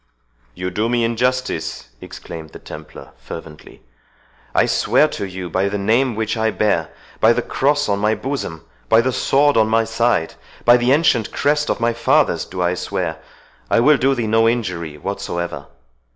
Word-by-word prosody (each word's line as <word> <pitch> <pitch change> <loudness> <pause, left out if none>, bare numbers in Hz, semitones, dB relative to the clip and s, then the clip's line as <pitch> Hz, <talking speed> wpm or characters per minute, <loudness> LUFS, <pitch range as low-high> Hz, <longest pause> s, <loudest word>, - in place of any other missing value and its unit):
"You 90 0 -4
do 110 +5 -1
me 120 -1 +1
injustice," 120 - -1
exclaimed 80 -2 -9
the - - -8
Templar 75 0 -11
fervently; 80 -2 -11 0.7
"I - - +4
swear - - +3
to - - -4
you 95 -1 -6
by 95 +3 0
the 105 - -2
name 115 +5 +1
which 110 +1 -1
I 110 -1 +1
bear—by 105 +2 0
the 125 - -1
cross 145 +2 +1
on 100 -1 0
my 105 +2 +2
bosom—by 85 - -2
the 130 +3 +1
sword 145 +2 +2
on 110 -1 +4
my 115 +1 +2
side—by 115 +1 +1
the 120 +1 +1
ancient 135 -7 +2
crest 150 +1 +1
of - - 0
my 115 0 +1
fathers 115 0 +2
do 90 -1 -4
I 90 0 +1
swear, 85 -2 -3 0.5
I - - +3
will 150 +5 +5
do 135 +1 +2
thee 120 -3 -2
no 115 +1 +3
injury 90 -10 -3
whatsoever! 85 +3 -4
110 Hz, 165 wpm, -19 LUFS, 90-120 Hz, 0.7 s, will